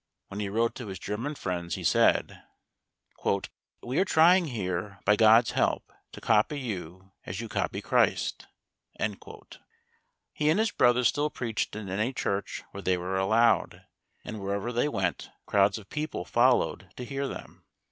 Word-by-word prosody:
When 100 Hz, -, -6 dB
he 100 Hz, -1 st, -2 dB
wrote 115 Hz, +3 st, +1 dB
to 125 Hz, -, -7 dB
his 95 Hz, -1 st, -6 dB
German 115 Hz, +11 st, -4 dB
friends, 85 Hz, -, -3 dB
he -, -, -7 dB
said: -, -, +2 dB, 1.4 s
"We 125 Hz, +4 st, -1 dB
are -, -, +5 dB
trying 175 Hz, 0 st, +5 dB
here, 100 Hz, -, -4 dB
by 105 Hz, +1 st, +5 dB
God's 115 Hz, +1 st, +6 dB
help, -, -, 0 dB, 0.2 s
to -, -, -9 dB
copy 125 Hz, +8 st, +2 dB
you 95 Hz, -, -6 dB, 0.2 s
as 95 Hz, +2 st, -4 dB
you 115 Hz, -, -4 dB
copy -, -, -2 dB
Christ." -, -, +1 dB, 0.5 s
He 110 Hz, +7 st, -6 dB
and 160 Hz, -, +3 dB
his 220 Hz, 0 st, +2 dB
brother 120 Hz, +1 st, +3 dB
still 145 Hz, +4 st, +2 dB
preached 115 Hz, -6 st, -3 dB
in 110 Hz, -2 st, -6 dB
any 105 Hz, +7 st, -1 dB
church 100 Hz, -4 st, -3 dB
where 100 Hz, -, -7 dB
they 95 Hz, -1 st, +1 dB
were 90 Hz, +2 st, -3 dB
allowed, 110 Hz, +4 st, +2 dB, 0.4 s
and 110 Hz, -, -6 dB
wherever 100 Hz, +4 st, -2 dB
they 120 Hz, +5 st, +1 dB
went 95 Hz, -10 st, -2 dB, 0.2 s
crowds 100 Hz, +1 st, +3 dB
of 105 Hz, -3 st, -12 dB
poor -, -, -17 dB
people 155 Hz, 0 st, -3 dB
followed 125 Hz, +1 st, +2 dB
to 125 Hz, -, -6 dB
hear 135 Hz, +1 st, -3 dB
them. -, -, -9 dB
110 Hz, 160 wpm, -28 LUFS, 95-125 Hz, 1.4 s, God's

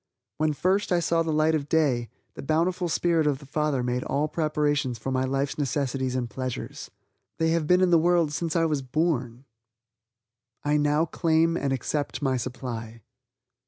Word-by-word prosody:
When 155 Hz, 0 st, +2 dB
first 190 Hz, +7 st, 0 dB
I 175 Hz, -, +4 dB
saw 165 Hz, 0 st, +1 dB
the 165 Hz, -1 st, -1 dB
light 155 Hz, +1 st, +2 dB
of 150 Hz, -2 st, -1 dB
day, 135 Hz, -8 st, +1 dB, 0.2 s
the -, -, -8 dB
bountiful 170 Hz, +4 st, 0 dB
spirit 165 Hz, -1 st, +2 dB
of 145 Hz, -2 st, +1 dB
the 140 Hz, -, -14 dB
Father 140 Hz, -2 st, -1 dB
made 125 Hz, 0 st, -1 dB
all 145 Hz, +3 st, 0 dB
preparations 150 Hz, -5 st, 0 dB
for 125 Hz, +4 st, -4 dB
my 130 Hz, 0 st, +1 dB
life's 135 Hz, +2 st, -2 dB
necessities 130 Hz, -2 st, -1 dB
and 125 Hz, -2 st, -1 dB
pleasures. 130 Hz, 0 st, -5 dB, 0.5 s
They 160 Hz, 0 st, +1 dB
have 165 Hz, -2 st, 0 dB
been 180 Hz, +2 st, +4 dB
in 185 Hz, -1 st, +3 dB
the 170 Hz, -, +6 dB
world 170 Hz, -2 st, +2 dB
since 165 Hz, 0 st, -2 dB
I 165 Hz, -1 st, +3 dB
was 150 Hz, -3 st, 0 dB
born. 130 Hz, -3 st, -1 dB, 1.2 s
I 145 Hz, 0 st, +1 dB
now 150 Hz, +2 st, +2 dB
claim 165 Hz, -1 st, +2 dB
and 140 Hz, -5 st, -1 dB
accept 140 Hz, +3 st, -2 dB
my 135 Hz, -3 st, 0 dB
supply. 115 Hz, -3 st, -5 dB
150 Hz, 175 wpm, -26 LUFS, 130-165 Hz, 1.2 s, the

